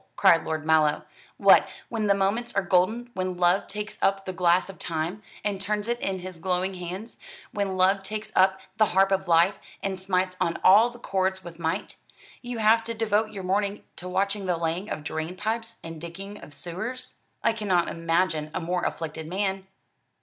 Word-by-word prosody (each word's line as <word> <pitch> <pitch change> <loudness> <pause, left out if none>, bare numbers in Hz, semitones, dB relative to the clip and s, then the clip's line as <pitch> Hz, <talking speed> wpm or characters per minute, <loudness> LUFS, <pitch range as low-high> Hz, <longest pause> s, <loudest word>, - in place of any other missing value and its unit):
cried 170 -4 +5
Lord 155 -1 -3
Mallow; 155 -1 +3 0.3
"what, - - +6 0.2
when 220 -2 -1
the 200 - +4
moments 210 +5 0
are 200 - +2
golden, 205 +7 +1
when 185 -1 -2
'Love 180 +2 +3
takes 210 +1 -6
up 195 0 +2
the 185 - -4
glass 175 0 +3
of 195 - -11
Time, 170 +4 -3 0.2
and 200 -2 -1
turns 210 +1 -1
it 240 0 -1
in 190 -4 -2
his 180 -2 -8
glowing 185 +2 0
hands,' 185 +5 -7 0.3
when 200 -2 -2
'Love 190 +2 +4
takes 215 +2 -5
up 190 0 +4 0.2
the 215 - +5
harp 195 0 +5
of 190 -1 +1
life, 170 +3 +4 0.2
and 190 -1 -2
smites 185 -1 0
on 165 - +1
all 210 +6 +7
the 240 - -12
chords 190 -4 -1
with 170 -1 -10
might,' 160 -1 -2 0.4
you 245 -1 -5
have 225 +1 +4
to 230 0 -4
devote 215 -1 +1
your 195 -3 -6
morning 200 +2 0
to 180 - -7
watching 195 +1 -1
the 175 -2 +1
laying 170 +5 -2
of 150 - -4
drain 160 +3 -4
pipes 225 +3 -3
and 165 -1 -8
digging 195 +5 -7
of - - -11
sewers! 190 +12 -6 0.2
I 230 - +3
cannot 190 -6 +1
imagine 165 -2 0
a - - 0
more 180 +1 -1
afflicted 160 -1 -4
man." 190 +1 -1
190 Hz, 190 wpm, -26 LUFS, 175-210 Hz, 0.4 s, all